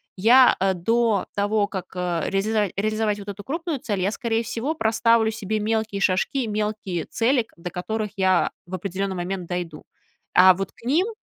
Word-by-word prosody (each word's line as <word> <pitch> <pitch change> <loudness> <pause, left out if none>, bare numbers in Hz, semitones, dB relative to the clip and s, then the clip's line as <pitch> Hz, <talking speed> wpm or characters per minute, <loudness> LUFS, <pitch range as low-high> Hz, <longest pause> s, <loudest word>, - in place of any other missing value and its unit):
я, 245 +6 +6
э, 190 0 +2
до 225 +3 +1
того, 205 +1 +1
как, 190 -3 -5
э, 175 -2 -1
резизова 210 +1 +1
реализовать 215 0 0
вот 205 0 -8
эту 200 0 -7
крупную 325 0 -3
цель, 205 -5 -3
я, 195 +3 +1
скорее 230 0 -1
всего, 235 +7 -3
проставлю 225 -2 +2
себе 215 0 -3
мелкие 220 -1 -1
шажки, 200 +8 +1
мелкие 210 -5 -2
цели, 245 +2 +1
к 225 - -14
до 175 +1 -6
которых 210 +3 -3
я 185 -2 +2 0.2
в 185 - -4
определенный 190 +1 -3
момент 180 0 -4
дойду. 175 -4 -5 0.5
А 185 +1 +8
вот 195 +1 -4
к - - -22
ним 320 - +2
210 Hz, 175 wpm, -23 LUFS, 185-225 Hz, 0.5 s, А